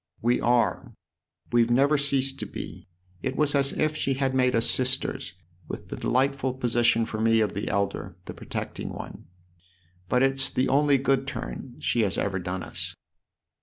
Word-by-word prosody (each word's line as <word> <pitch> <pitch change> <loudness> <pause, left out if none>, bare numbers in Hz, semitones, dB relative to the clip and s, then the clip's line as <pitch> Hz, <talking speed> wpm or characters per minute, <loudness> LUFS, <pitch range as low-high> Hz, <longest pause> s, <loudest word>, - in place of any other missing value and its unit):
" - - -35
We 125 - +3
are 120 0 +1 0.6
we've 120 -1 +4
never 140 +5 +4
ceased 135 -1 +1
to - - -4
be. - - -8 0.3
It 130 0 -2
was 150 0 +2
as 140 -1 +3
if 155 0 0
she 135 -3 0
had 135 -1 0
made 125 -1 +3
us 115 - +2
sisters, 130 -7 0 0.3
with - - -7
the - - -4
delightful 130 0 0
position 120 -2 +2
for 110 0 -4
me 115 0 +4
of 105 -3 +1
the 100 - -3
elder, 100 -2 -2
the - - -7
protecting - - -5
one. - - -8 0.8
But 125 +1 +3
it's 135 0 +2
the 130 +1 0
only 145 +1 +4
good 135 0 +1
turn 130 -2 -6
she 120 - +1
has 100 -3 +1
ever 95 -2 -1
done 90 +1 -4
us." - - -3
130 Hz, 175 wpm, -26 LUFS, 115-135 Hz, 0.8 s, we've